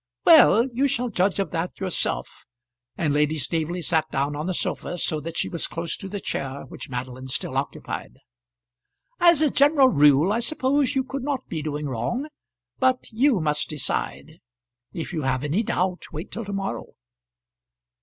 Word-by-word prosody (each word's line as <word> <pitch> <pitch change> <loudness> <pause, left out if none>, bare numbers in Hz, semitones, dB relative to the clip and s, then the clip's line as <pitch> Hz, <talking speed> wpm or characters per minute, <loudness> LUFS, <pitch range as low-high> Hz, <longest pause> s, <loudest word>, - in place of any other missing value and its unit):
"Well; 280 -7 +7
you 270 +4 +2
shall 250 -2 0
judge 190 -2 +1
of 195 - -1
that 170 +1 -3
yourself;" 185 -3 -3 0.5
and 155 -4 +1
Lady 150 +1 +2
Staveley 165 +4 -2
sat 160 -1 +1
down 140 +1 -1
on 150 +3 -3
the 185 - 0
sofa 175 - -2
so 155 -2 0
that 165 +2 -6
she - - 0
was 170 - -3
close 165 0 -3
to 195 - -7
the 205 +1 -4
chair 135 -6 -4
which - - -9
Madeline 130 +1 -5
still 130 - -4
occupied. - - -4 1.0
"As 340 -3 +5
a 300 - +3
general 280 -1 +5
rule 150 - +5
I 230 - +1
suppose 275 +2 +1
you 265 - +2
could 270 +1 -5
not 270 -2 -2
be 160 -3 -4
doing 150 -1 -3
wrong; 235 - -2 0.5
but 255 -1 +1
you 240 0 +3
must 150 -2 0
decide. 155 +2 -4 0.5
If 170 +2 -5
you 160 - -1
have 130 -1 0
any 150 +8 +1
doubt, 185 -4 -2
wait 160 +6 -7
till 230 0 -5
to 200 - -5
morrow." 195 0 -4
175 Hz, 175 wpm, -24 LUFS, 150-245 Hz, 1.0 s, Well